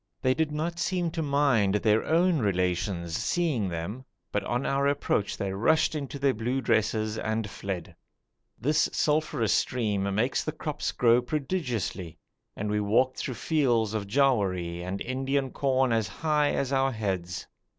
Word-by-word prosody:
They 130 -1 +4
did 155 +1 0
not 165 +3 -3
seem 175 0 0
to 165 0 -3
mind 140 -9 +2
their 105 +1 +3
own 170 0 +3
relations 90 -4 -1
seeing 145 - 0
them, 90 +9 -5 0.3
but 105 - -1
on 120 +3 -1
our 140 0 +1
approach 140 -7 0
they 95 -1 -2
rushed 155 +13 +2
into 140 -2 -4
their 140 -1 +2
blue 120 +4 -1
dresses 110 -2 0
and 110 -1 -1
fled. 95 -4 -6 0.6
This 150 +4 +2
sulphureous 150 -7 +1
stream 100 -6 0
makes 120 +6 +1
the 155 - -3
crops 150 -1 -3
grow 120 0 +4
prodigiously, 125 - -3 0.4
and 105 - -3
we 105 - +1
walked 115 +6 +2
through 130 - -3
fields 120 -7 +1
of 105 -2 -2
jowari 100 -9 +1
and 90 +2 -4
Indian 135 +1 -1
corn 130 -2 +1
as 115 -3 +1
high 150 +7 +1
as 140 0 -1
our 135 0 +2
heads. 90 -5 -3
120 Hz, 155 wpm, -27 LUFS, 100-140 Hz, 0.6 s, They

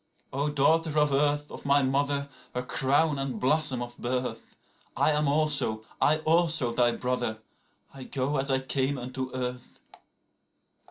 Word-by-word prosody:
93O 145 +2 -1
daughter 160 +2 +2
of 150 -1 +2
earth, 145 +1 +1
of - - -9
my 140 0 +3
mother, 140 +1 0 0.3
her 125 - -2
crown 140 +3 +1
and 135 -5 -3
blossom 130 -1 +1
of 120 0 -9
birth,94I 125 +4 -3
am 150 0 +1
also, 140 -7 +1 0.2
I 155 - +4
also, 160 -6 +3
thy 120 0 +3
brother; 125 -3 -2 0.6
I 135 -2 -10
go 135 +2 -2
as 135 +1 -1
I 130 0 +1
came 135 +1 0
unto 130 +1 -5
earth. 125 -1 -5
135 Hz, 145 wpm, -27 LUFS, 125-150 Hz, 0.6 s, I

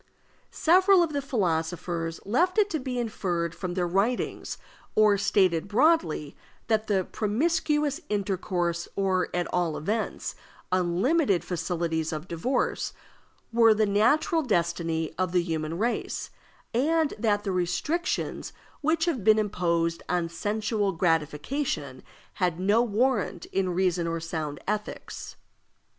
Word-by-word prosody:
Several 370 +2 +5
of 320 -3 -2
the 285 - 0
philosophers 170 -7 -1
left 350 - +1
it 415 -1 +3
to 315 - 0
be 255 -1 -4
inferred 180 -8 -2
from 180 -2 -5
their 180 -2 +1
writings, 195 +8 -1 0.4
or 215 -1 +5
stated 190 -3 +2
broadly, 210 - +2 0.3
that 215 -4 +1
promiscuous 295 - 0
intercourse, 180 -4 -1
or, 190 -2 +1
at 175 0 -1
all 175 -3 0
events, 215 +8 -2 0.4
unlimited 185 - +2
facilities 165 -2 -2
of 155 +2 -5
divorce, 195 +11 -1 0.6
were 225 -1 +6
the 215 0 +3
natural 240 +11 +3
destiny 170 - -1
of 185 -1 0
the 180 -1 +3
human 160 -1 -3
race, 235 +5 -2 0.4
and 310 +5 +2
that 205 -2 +1
the 195 - -2
restrictions 185 - -1 0.3
which 320 +2 +2
have 295 - -1
been 215 +1 +6
imposed 170 -5 0
on 175 -2 +1
sensual 205 +3 -1
gratification 155 - -1 0.4
had 175 -2 +1
no 205 +5 +3
warrant 210 -6 0
in 190 -1 +1
reason 180 -1 +1
or 165 0 -2
sound 160 -3 -4
ethics. 210 +1 -4
195 Hz, 120 wpm, -27 LUFS, 170-240 Hz, 0.6 s, were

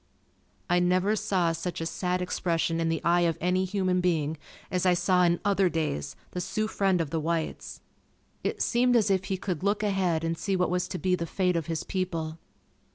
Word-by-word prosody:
I 175 0 +3
never 185 +4 +2
saw 185 -5 +1
such 165 +1 -4
a 165 - -3
sad 180 +2 -1
expression 165 -2 0
in 165 - +1
the 165 - -1
eye 175 +1 +3
of 165 -2 +1
any 180 +1 +1
human 185 -1 0
being 160 -4 +1 0.4
as 180 -1 0
I 180 -1 +4
saw 180 +1 +2
in 175 -1 +4
"Otherdays" 170 - 0 0.2
the 180 - -3
Sioux 215 +4 -1
friend 195 -4 +1
of 160 -4 -2
the 165 - 0
whites. 160 0 -3 0.6
It - - -1
seemed 245 +1 +3
as 215 -3 +3
if 190 0 +1
he 195 -1 -2
could 180 -3 -3
look 205 +2 0
ahead 185 -5 +1
and 165 0 0
see 190 +4 -1
what 180 -2 +1
was 180 0 0
to 185 - -4
be 185 0 0
the 170 -2 -1
fate 180 +1 0
of 165 -2 -1
his 165 -2 -2
people. 165 -4 -3
180 Hz, 205 wpm, -28 LUFS, 165-190 Hz, 0.6 s, I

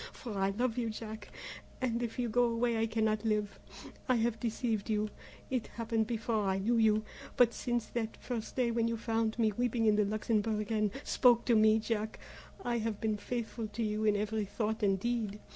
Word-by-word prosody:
For 230 -5 -7
I 195 0 +2
love 240 +4 -1
you, 230 -2 -1
Jack, 220 -1 -7 0.5
and 240 -2 0
if 235 -2 -3
you 245 -1 0
go 245 +2 +3
away 235 0 +1
I 225 - +2
cannot 220 -1 0
live. 210 -2 -1 0.5
I 255 - +5
have 230 -1 +1
deceived 225 -2 -1
you; 215 -1 0 0.4
it 255 -4 -1
happened 225 -1 -1
before 225 -2 -1
I 190 0 +1
knew 225 +5 +1
you, 215 -1 +4 0.3
but 240 -1 +5
since 240 -2 -1
that 225 -2 -4
first 235 -3 -5
day 245 -2 +2
when 230 0 +1
you 230 0 -1
found 225 0 -1
me 220 -2 +3
weeping 235 +1 0
in 210 -1 +4
the 210 - +4
Luxembourg 215 0 0
and 215 -1 +2
spoke 240 -2 +4
to 235 - +4
me, 215 0 +6
Jack, 220 -1 -2 0.5
I 240 -1 +1
have 220 -2 -2
been 215 -1 0
faithful 230 0 -4
to 220 +2 -3
you 215 0 -1
in 210 -1 +4
every 210 +1 -1
thought 220 +2 -2
and 195 -2 +2
deed. 220 -2 -2
225 Hz, 200 wpm, -32 LUFS, 215-235 Hz, 0.5 s, me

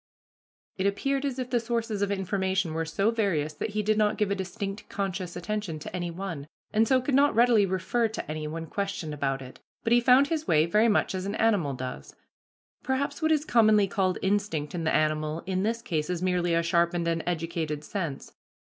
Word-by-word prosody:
It 190 +1 +1
appeared 275 +7 0
as 270 -2 -2
if 255 -1 -4
the 240 - +3
sources 230 -3 -2
of 200 - +1
information 190 -3 -1
were 165 0 -1
so 195 +7 +1
various 180 -10 0
that 150 - -4
he 210 - +1
did 215 +1 +2
not 210 -1 +2
give 210 -2 0
a - - +2
distinct 195 +2 -5
conscious 190 -3 -3
attention 185 -2 -3
to 155 - -7
any 175 -1 -2
one, 170 -5 -5 0.3
and 220 +1 +3
so 260 +2 +4
could 265 +2 -2
not 280 0 +4
readily 230 -3 +5
refer 190 +6 0
to 220 - -6
any 155 0 -4
when 165 +2 -5
questioned 195 -4 -3
about 135 -2 -2
it, 130 - -12 0.2
but 230 - +2
he 240 - +5
found 255 +3 +5
his 315 -2 -2
way 155 0 +4
very 210 +7 +3
much 210 - +2
as 185 +1 -3
an 200 - -3
animal 195 -12 +2
does. 125 0 -7 0.7
Perhaps 280 +3 -2
what 315 0 +2
is 305 -1 +2
commonly 215 -5 +4
called 185 -1 0
instinct 195 -7 0
in 170 -2 -3
the 160 - +2
animal 155 +1 0
in 185 0 -1
this 230 +3 -1
case 155 -5 -2
is 180 0 -2
merely 175 -2 +1
a 170 - +2
sharpened 170 0 +1
and 165 -1 0
educated 165 -3 -2
sense. 160 -5 -5
190 Hz, 210 wpm, -27 LUFS, 165-220 Hz, 0.7 s, readily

